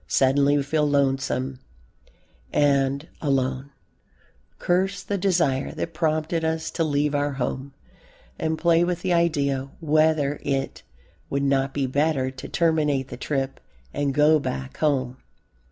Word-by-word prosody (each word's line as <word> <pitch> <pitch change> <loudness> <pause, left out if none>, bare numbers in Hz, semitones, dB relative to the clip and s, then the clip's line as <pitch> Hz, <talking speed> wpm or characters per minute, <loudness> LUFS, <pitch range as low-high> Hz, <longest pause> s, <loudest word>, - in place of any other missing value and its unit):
Suddenly 140 +2 +3
we 140 - +1
feel 150 +1 +1
lonesome 135 -2 0 0.9
and 140 +1 +2
alone, 135 -2 0 0.9
curse 190 +2 0
the 205 - -2
desire 170 -8 +1
that 165 - -4
prompted 155 +1 0
us 160 0 -1
to 165 - -1
leave 145 -1 0
our 145 0 0
home, 135 +1 -4 0.6
and 160 0 -1
play 170 0 +3
with 175 0 -2
the 185 -2 +1
idea 140 -5 +1
whether 155 -2 +2
it 135 -1 -2 0.5
would 140 0 -1
not 135 -1 +1
be 140 -2 +1
better 135 0 0
to 130 - -9
terminate 150 -5 +1
the - - -6
trip 135 -2 -3 0.3
and 145 -1 0
go 150 +1 +5
back 65 - -5
home. 130 -4 0
145 Hz, 135 wpm, -24 LUFS, 135-160 Hz, 0.9 s, go